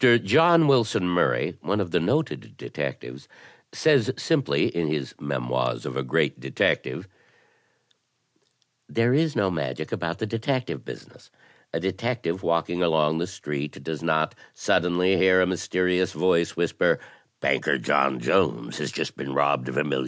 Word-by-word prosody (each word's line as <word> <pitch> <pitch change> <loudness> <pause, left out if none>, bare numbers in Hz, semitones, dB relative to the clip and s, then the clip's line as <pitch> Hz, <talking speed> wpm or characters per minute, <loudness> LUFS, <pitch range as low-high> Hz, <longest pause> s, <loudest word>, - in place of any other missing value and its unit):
John 130 - +5
Wilson 115 -8 +3
Murray, 90 -9 +1
one 100 +3 -1
of 90 -4 -2
the - - +2
noted 150 - -2
detectives, - - -6 0.4
says 140 -7 +3
simply 155 -5 +1
in 85 -2 0
his 75 -4 -3
"Memoirs 65 -3 -2
of - - -5
a 70 - -1
Great 65 -1 0
Detective": 70 +7 -1 1.8
"There 115 +2 +2
is 155 +2 +1
no 100 -4 +1
magic 70 -7 -4
about 85 0 -3
the 110 - -3
detective 125 +4 -2
business. - - -12 0.4
A - - -2
detective 95 0 -2
walking 85 +1 0
along 80 -2 +2
the 85 - -2
street 75 -6 -6
does 80 +1 -5
not 80 -1 +1 0.2
suddenly 90 +2 +2
hear 95 +1 +5
a 90 - +4
mysterious 90 0 0
voice 85 0 +1
whisper - - +1 0.2
* - - -39
Banker - - +1
John 70 -2 +1
Jones - - 0
has - - -3
just - - -4
been 70 0 -6
robbed 70 -2 +1
of 65 - -5
$1,000,000.' 75 -2 0
85 Hz, 145 wpm, -25 LUFS, 75-105 Hz, 1.8 s, John